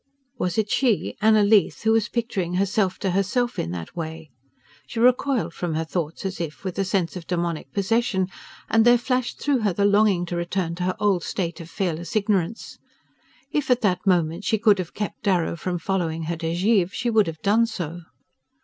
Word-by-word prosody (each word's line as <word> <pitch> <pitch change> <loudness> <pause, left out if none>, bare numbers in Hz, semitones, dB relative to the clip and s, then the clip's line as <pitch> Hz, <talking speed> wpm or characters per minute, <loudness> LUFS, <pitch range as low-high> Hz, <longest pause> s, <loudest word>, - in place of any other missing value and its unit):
Was 180 +1 -1
it 210 -2 0
she, 245 -7 +1
Anna 215 -1 +5
Leath, 205 -1 +3
who 220 - +3
was 225 0 +2
picturing 195 -7 -2
herself 195 0 +1
to 195 -4 -1
herself 210 +6 0
in - - -2
that 85 -1 -6
way? 160 -2 -6 0.6
She 230 - -5
recoiled 245 - +2
from 170 -2 -3
her 160 +1 -1
thoughts 165 +1 -4
as 190 -2 -3
if 150 -5 -6
with 185 0 -4
a - - +3
sense 190 -3 -1
of 175 -2 -8
demoniac 170 -5 -2
possession, 200 -1 +1 0.4
and 225 0 +4
there 240 +1 +6
flashed 250 0 -2
through 285 -3 +1
her 205 -4 +1
the 200 +3 +1
longing 200 -3 +3
to 175 - -4
return 170 0 -2
to 180 +1 -3
her 185 - 0
old 195 -5 +2
state 175 -1 -3
of 165 - -10
fearless 170 -1 -3
ignorance. 205 -1 -1 0.7
If 295 -3 -1
at 250 -1 +3
that 190 -2 0
moment 170 0 +2
she 220 - +1
could 210 -2 +4
have 180 -2 -5
kept 210 0 -4
Darrow 180 -4 +1
from 175 +1 -3
following 165 -2 -2
her 165 +1 -3
to 165 0 -4
Givre 185 +1 +2
she 240 +2 -2
would 215 -4 +4
have 160 -1 -6
done 220 +3 +3
so... 175 -6 -5
190 Hz, 200 wpm, -24 LUFS, 170-220 Hz, 0.7 s, there